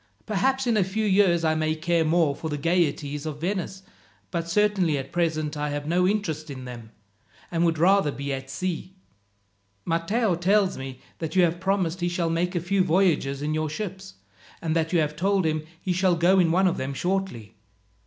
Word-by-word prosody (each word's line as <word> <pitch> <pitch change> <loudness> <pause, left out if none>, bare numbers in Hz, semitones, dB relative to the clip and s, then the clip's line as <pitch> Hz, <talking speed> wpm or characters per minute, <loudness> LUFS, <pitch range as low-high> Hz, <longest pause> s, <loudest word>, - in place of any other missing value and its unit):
Perhaps 265 +6 +1
in 235 -2 +2
a 200 - +4
few 210 +4 -2
years 190 -4 +3
I 160 -1 +3
may 155 0 0
care 165 +1 +1
more 160 -2 +2
for 160 - -5
the 150 - -2
gaieties 150 -2 0
of 150 -1 -5
Venice, 190 +2 -3 0.5
but 170 -1 -3
certainly 190 -5 +2
at 135 0 -6
present 160 -3 -1
I 150 0 -2
have 145 0 -4
no 180 +3 +2
interest 165 -7 -2
in 130 -2 -7
them, 120 -3 -9 0.6
and 170 -1 +1
would 165 -1 +1
rather 185 -1 +4
be 140 0 -4
at 135 0 -6
sea. 180 +5 -4 0.9
Matteo 180 +6 +1
tells 190 +3 +2
me 130 -1 -7 0.2
that 160 0 -4
you 185 - +5
have 170 0 +1
promised 185 -2 0
he 175 - +1
shall 175 -1 -1
make 175 +2 -1
a - - +2
few 185 +3 +1
voyages 160 -6 +1
in 150 +1 -1
your 155 0 -1
ships, 190 +3 -6 0.4
and 160 -1 -2
that 160 -1 0
you 180 - +3
have 150 -2 0
told 190 +2 +1
him 155 -1 -1
he 180 0 -1
shall 185 0 +2
go 175 +3 +4
in 170 -3 +3
one 185 +3 +3
of 180 - +2
them 135 +1 -3
shortly. 180 - -2
170 Hz, 200 wpm, -25 LUFS, 155-190 Hz, 0.9 s, you